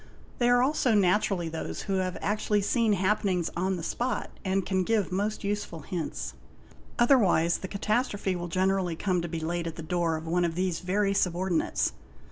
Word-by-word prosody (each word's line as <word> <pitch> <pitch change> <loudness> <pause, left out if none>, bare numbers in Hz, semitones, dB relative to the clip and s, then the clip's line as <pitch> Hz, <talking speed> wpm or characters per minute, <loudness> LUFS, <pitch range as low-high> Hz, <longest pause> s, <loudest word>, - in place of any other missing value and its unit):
They 240 -1 +3
are 245 0 +5
also 260 -4 +2
naturally 195 -2 +2
those 160 0 -5
who 195 -2 -1
have 185 -1 -1
actually 210 0 0
seen 225 +1 +2
happenings 190 -2 +1
on 185 +2 0
the 165 - -6
spot 245 +9 -2
and 190 -1 0
can 190 -1 +1
give 210 -1 +1
most 205 +4 -1
useful 200 -5 -3
hints. 165 +3 -4 0.6
Otherwise 200 - +4
the 190 - -5
catastrophe 205 -1 -1
will 175 0 -4
generally 185 0 +1
come 180 +1 0
to 170 - -3
be 165 - -3
laid 170 +1 -2
at 165 - -5
the 165 - -7
door 170 0 0
of 160 - -8
one 175 +2 +1
of 165 -1 0
these 180 -2 0
very 195 +2 +1
sub 180 -3 +1
ordinates. 180 -2 0
190 Hz, 185 wpm, -28 LUFS, 175-205 Hz, 0.6 s, are